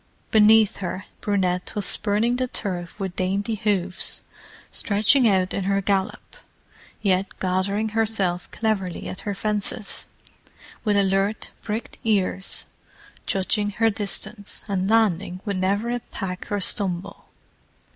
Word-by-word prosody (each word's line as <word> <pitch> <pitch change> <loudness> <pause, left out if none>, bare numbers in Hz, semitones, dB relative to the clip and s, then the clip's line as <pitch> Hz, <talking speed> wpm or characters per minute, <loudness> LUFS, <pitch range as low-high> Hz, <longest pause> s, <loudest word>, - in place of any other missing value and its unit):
Beneath 220 0 +6
her 185 0 -4 0.2
Brunette 185 -3 0
was 205 - +1
spurning 220 +4 +2
the 255 0 0
turf 180 -6 -4
with 190 -2 -3
dainty 195 +4 0
hooves; 195 -4 -1 0.5
stretching 220 +5 +3
out 190 -2 +2
in 195 - -1
her 195 0 +2
gallop, 195 0 -1 0.7
yet 190 -1 +3
gathering 195 +4 0
herself 210 -5 0
cleverly 200 -6 -1
at - - -5
her 205 -2 -3
fences, 210 +1 -1 0.8
with 210 -3 +2
alert, 195 +2 +1
pricked 220 +1 -4
ears—judging 200 0 -2
her 225 +2 +3
distance, 205 0 -2
and 195 -1 0
landing 200 -5 +2
with 200 -3 -1
never 200 +5 +1
a 245 - 0
peck 190 -5 -6
or 205 - +1
stumble. 195 0 -1
200 Hz, 120 wpm, -24 LUFS, 190-215 Hz, 0.8 s, Beneath